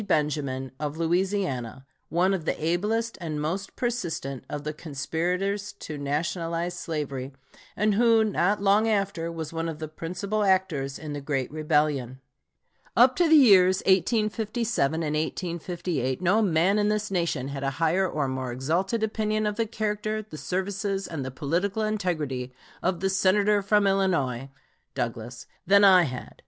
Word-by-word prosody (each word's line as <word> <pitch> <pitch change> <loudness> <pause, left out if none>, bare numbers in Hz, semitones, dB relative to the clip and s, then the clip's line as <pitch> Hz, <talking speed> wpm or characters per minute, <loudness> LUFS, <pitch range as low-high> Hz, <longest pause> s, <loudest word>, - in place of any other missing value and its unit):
Benjamin, 145 -5 -1
of 150 0 -3
Louisiana, 165 - -1 0.2
one 180 +3 +2
of 175 -5 -3
the - - -1
ablest 210 +9 -1
and 155 -3 -3
most 175 +6 -3
persistent 170 - -3
of 145 0 -4
the 155 +1 -3
conspirators 180 +7 -2
to 160 -6 -8
nationalize 165 +4 -2
slavery, 145 -6 -4 0.4
and 210 +1 +2
who, 230 +1 +4
not 205 -1 +1
long 205 +3 +4
after, 195 -5 -1
was 160 -1 -6
one 165 0 -2
of 160 - -5
the 155 0 -5
principal 185 +7 -3
actors 185 -9 +1
in 155 -2 -6
the 145 - -5
great 135 -3 -2
rebellion: 150 -4 0 0.8
Up 255 +2 +6
to 345 -2 +3
the 320 - +7
years 190 -9 +6
1857 215 - +1
and 150 -1 -1
1858 170 -4 -2
no 185 +5 +3
man 190 +1 +3
in 210 0 +2
this 210 -1 -1
nation 170 -8 -1
had 140 -1 -5
a 135 - +1
higher 170 +3 +2
or 150 -4 -1
more 130 -1 -3
exalted 170 - -1
opinion 215 0 0
of 210 -1 -1
the 225 0 0
character, 215 0 -2
the 205 - -11
services, 195 +3 -2
and 160 -5 -5
the 130 - -4
political 170 +10 -1
integrity 155 -12 -2 0.3
of 180 -2 -1
the 190 - +1
Senator 200 +2 +3
from 205 +1 +3
Illinois 165 -10 +1 0.5
[Douglas] 115 +1 -4 0.2
than 200 +1 +6
I 185 -3 +7
had.... 125 -3 -7
175 Hz, 155 wpm, -26 LUFS, 150-200 Hz, 0.8 s, the